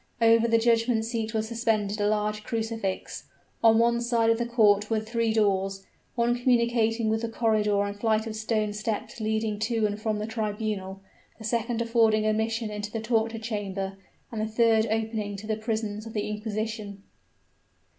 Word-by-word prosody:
Over 230 0 +5
the 230 0 +4
judgment 230 0 +2
seat 225 -1 -3
was 220 0 0
suspended 220 -3 0
a 205 - +2
large 210 0 0
crucifix. 225 -4 -3 0.4
On 225 -1 +6
one 235 +1 +3
side 235 -1 +2
of 225 - +1
the 240 - -1
court 210 -3 +3
were 225 -1 +1
three 225 +1 -1
doors, 195 -3 +1 0.3
one 240 0 +2
communicating 235 -2 +2
with 220 +1 +1
the 230 - -2
corridor 215 -3 +1
and 200 0 -3
flight 220 +1 +1
of 220 -1 -5
stone 215 -1 -1
steps 215 +2 -4
leading 220 -1 -1
to 220 0 0
and 205 0 -2
from 215 -1 0
the 210 - -3
tribunal; 210 -3 -3 0.4
the 220 - -11
second 235 +1 -1
affording 225 -2 +3
admission 220 +1 0
into 210 0 -4
the 225 - -3
torture 225 0 0
chamber 200 -4 -4 0.4
and 220 -2 -3
the 215 - -1
third 225 0 +3
opening 220 -2 -2
to 200 +2 -8
the 215 0 -1
prisons 215 -1 -3
of 225 - -9
the 210 - -2
inquisition. 210 -1 -4
220 Hz, 175 wpm, -27 LUFS, 210-230 Hz, 0.4 s, On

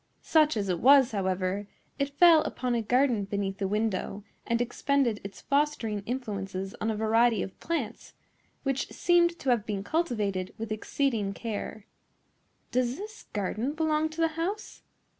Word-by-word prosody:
Such 310 -5 +3
as 200 -2 -1
it 180 -2 0
was, 270 +1 +6
however, 190 0 -1 0.3
it 280 0 -2
fell 335 -3 +8
upon 250 -4 -2
a 235 - +1
garden 245 -2 +2
beneath 195 -1 -3
the 195 - 0
window 205 -1 -1 0.2
and 235 0 +1
expended 245 -1 0
its 195 0 -9
fostering 280 -8 0
influences 195 -6 -4
on 220 - 0
a 220 - 0
variety 220 0 +3
of 190 - -9
plants, 275 -9 -4 0.5
which 270 -1 -1
seemed 345 -1 +3
to 270 -6 0
have 235 -4 +2
been 205 -2 -3
cultivated 210 - -1
with 225 0 -5
exceeding 215 -2 -1
care. 215 -2 -5 0.9
"Does 250 +1 0
this 425 +2 -9
garden 215 +7 -2
belong 315 0 +1
to 315 +1 -5
the 325 - +3
house?" 345 +7 -4
235 Hz, 155 wpm, -28 LUFS, 205-285 Hz, 0.9 s, fell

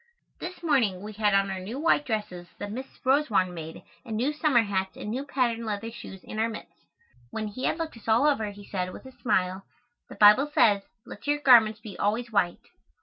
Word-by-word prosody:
This 355 0 -7
morning 230 - +1
we 215 +1 -7
had 210 -1 +2
on 195 0 +2
our 190 - -4
new 215 +9 -6
white 305 -1 +2
dresses 210 -6 -3
that 205 0 -6
Miss 260 +5 -5 0.2
Rosewarne 255 -10 +2
made 160 -1 -8 0.2
and 220 -2 -4
new 265 +7 0
summer 295 -6 +3
hats 190 -2 -2
and 210 - -5
new 260 +4 -2
patten 245 -5 -1
leather 220 +1 -4
shoes 190 -4 -10
and 215 - -5
our 225 +1 +1
mitts. 220 - -9 0.6
When 215 - -4
he 255 +6 -5
had - - 0
looked 325 -7 -5
us 230 - -16
all 225 +5 +4
over 250 -8 +2
he 205 0 -11
said, 185 -2 -3
with - - -11
a 260 - -10
smile, 190 -6 -1 0.5
"The - - -10
Bible 210 +8 +6
says, 205 -8 +4 0.2
let 205 - -11
your 290 0 +2
garments 225 -6 +5
be 210 -3 -10
always 235 +4 0
white." 180 -5 0
220 Hz, 210 wpm, -27 LUFS, 200-260 Hz, 0.6 s, Bible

